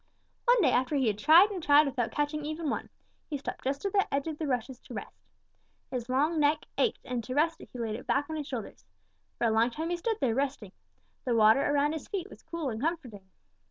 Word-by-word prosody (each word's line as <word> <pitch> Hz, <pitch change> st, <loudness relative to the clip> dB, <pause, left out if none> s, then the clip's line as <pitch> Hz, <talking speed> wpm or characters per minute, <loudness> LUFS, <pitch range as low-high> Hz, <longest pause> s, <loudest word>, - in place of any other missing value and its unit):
"One 485 Hz, -2 st, +5 dB
day 265 Hz, -, +4 dB
after 255 Hz, +4 st, +1 dB
he 270 Hz, -2 st, +2 dB
had 210 Hz, -2 st, 0 dB
tried 335 Hz, -, +7 dB
and 375 Hz, -3 st, -4 dB
tried 295 Hz, 0 st, +6 dB
without 250 Hz, -4 st, -1 dB
catching 295 Hz, +1 st, -1 dB
even 310 Hz, 0 st, -3 dB
one, -, -, -4 dB, 0.4 s
he 295 Hz, -, -2 dB
stopped 275 Hz, -, -6 dB
just 275 Hz, +6 st, -2 dB
at 395 Hz, -, -1 dB
the 395 Hz, -1 st, +2 dB
edge 275 Hz, 0 st, 0 dB
of 315 Hz, -2 st, -5 dB
the 315 Hz, -, -2 dB
rushes 250 Hz, -1 st, -2 dB
to -, -, -11 dB
rest. -, -, -8 dB, 0.7 s
His 250 Hz, -2 st, -4 dB
long 300 Hz, +6 st, +2 dB
neck 295 Hz, +1 st, +2 dB
ached, 465 Hz, -, 0 dB
and 245 Hz, -2 st, -3 dB
to 255 Hz, +3 st, -5 dB
rest 325 Hz, +3 st, +1 dB
it -, -, -12 dB
he -, -, -9 dB
laid 225 Hz, -2 st, -2 dB
it 230 Hz, -, -7 dB
back 285 Hz, +1 st, +1 dB
on 315 Hz, -, -5 dB
his 300 Hz, -2 st, -4 dB
shoulders. 235 Hz, -, -6 dB, 0.5 s
For -, -, 0 dB
a 225 Hz, -, +3 dB
long 225 Hz, +2 st, +3 dB
time 320 Hz, +7 st, -4 dB
he 350 Hz, -, 0 dB
stood 445 Hz, +5 st, -1 dB
there, 255 Hz, -5 st, +1 dB
resting. 265 Hz, -6 st, -2 dB, 0.5 s
The 245 Hz, -, 0 dB
water 220 Hz, +4 st, +6 dB
around 290 Hz, +1 st, +2 dB
his 320 Hz, -, -6 dB
feet 395 Hz, -1 st, -4 dB
was -, -, -13 dB
cool 320 Hz, -5 st, -4 dB
and 220 Hz, +1 st, -5 dB
comforting. 250 Hz, -, -4 dB
285 Hz, 240 wpm, -29 LUFS, 245-315 Hz, 0.7 s, tried